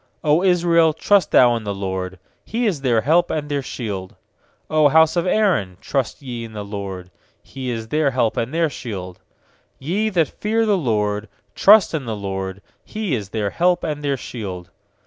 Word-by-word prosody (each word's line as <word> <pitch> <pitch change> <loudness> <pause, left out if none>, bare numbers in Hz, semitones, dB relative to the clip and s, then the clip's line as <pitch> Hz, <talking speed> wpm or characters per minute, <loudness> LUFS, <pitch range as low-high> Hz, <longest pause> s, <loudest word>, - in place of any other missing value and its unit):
90 160 +5 +3
Israel, 170 -2 +3
trust 200 +3 +2
thou 120 -2 +5
in 115 - -4
the 100 -1 -3
LORD! 95 -1 -4 0.3
He 235 +3 -2
is 180 -10 0
their 120 -4 +2
help 165 +8 +3
and 150 -1 -3
their 145 -1 -1
shield! 100 -8 -6 0.5
100 155 -1 +3
house 160 +1 +5
of 175 +1 0
Aaron, 180 - +1
trust 135 0 -3
ye 120 -3 -5
in 115 -1 -9
the 105 -1 -6
LORD! 95 -3 -6 0.3
He 130 -2 -6
is 115 -2 -4
their 150 0 +2
help 125 -4 0
and 115 +3 -2
their 165 +1 +1
shield! 95 - -7 0.6
nYe 195 +10 -1
that 170 -5 +2
fear 225 +2 -1
the 210 -2 +3
LORD, 105 - -1 0.2
trust 210 -2 +6
in 150 -5 -2
the 115 -2 -3
LORD! 95 -1 -5 0.2
He 215 -7 -4
is 105 -6 -3
their 105 -2 -2
help 180 +1 +1
and 150 -2 -3
their 140 -1 0
shield. 95 -8 -7
130 Hz, 185 wpm, -21 LUFS, 105-165 Hz, 0.6 s, trust